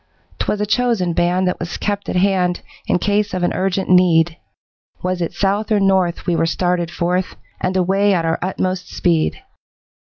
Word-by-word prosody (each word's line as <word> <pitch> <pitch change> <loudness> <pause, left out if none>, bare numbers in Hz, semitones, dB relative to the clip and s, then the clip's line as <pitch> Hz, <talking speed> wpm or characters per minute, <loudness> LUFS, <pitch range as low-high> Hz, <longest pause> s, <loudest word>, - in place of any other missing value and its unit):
'Twas 210 - -1
a 210 - 0
chosen 220 -5 +1
band 180 +2 +1
that 180 - -1
was 170 0 -4
kept 205 -1 -3
at - - -2
hand 180 -1 +1 0.3
In - - +2
case 205 +1 0
of 180 - -2
an 175 - +1
urgent 190 0 -1
need, 175 -2 +4 0.7
Was 180 0 -1
it 170 - -1
south 205 +2 -1
or 210 - +4
north 190 -3 +1
we 175 - +1
were 165 - +1
started 175 0 0
forth, 180 +2 -1 0.2
And 185 +1 -1
away 195 +3 +2
at 165 -2 0
our 165 0 0
utmost 185 0 -2
speed. 170 - 0
185 Hz, 180 wpm, -19 LUFS, 175-195 Hz, 0.7 s, need